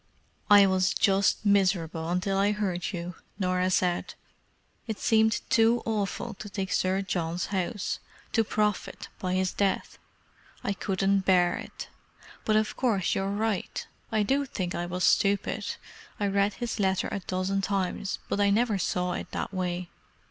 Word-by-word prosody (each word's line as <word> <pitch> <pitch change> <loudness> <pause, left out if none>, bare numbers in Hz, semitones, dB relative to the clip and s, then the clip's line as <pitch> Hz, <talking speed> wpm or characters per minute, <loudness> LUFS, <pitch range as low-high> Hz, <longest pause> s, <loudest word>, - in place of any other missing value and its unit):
"I 205 -1 +9
was 185 -1 +2
just 195 +2 +2
miserable 175 -5 +2
until 180 +2 0
I 200 +2 +3
heard 190 -4 -2
you," 175 -1 -5 0.2
Norah 185 -1 +1
said. 180 -1 0 0.7
"It 220 -2 -3
seemed 220 -1 +2
too 230 +1 +4
awful 220 +1 -2
to 205 - -7
take 190 -1 -3
Sir 190 +1 +1
John's 175 -2 -2
house—to 205 +3 -2
profit 210 -1 -1
by 185 -1 -1
his 185 0 0
death. 200 -1 -1 0.6
I 200 - 0
couldn't 195 0 +1
bear 180 -2 +4
it. - - -7 0.6
But 215 - +2
of 215 0 +1
course 215 -8 +1
you're 195 0 -1
right. 205 -1 -2 0.3
I 215 -1 +2
do 275 +6 +1
think 185 -8 -3
I 175 - -2
was 180 +1 -3
stupid—I 200 +1 0
read 200 +1 +1
his 240 -3 -4
letter 190 -2 +1
a - - -2
dozen 185 +1 -1
times, 195 0 -1
but - - -1
I 200 0 +4
never 215 0 +2
saw 180 0 0
it - - -5
that - - -3
way." 180 -1 -3
195 Hz, 150 wpm, -28 LUFS, 185-210 Hz, 0.7 s, I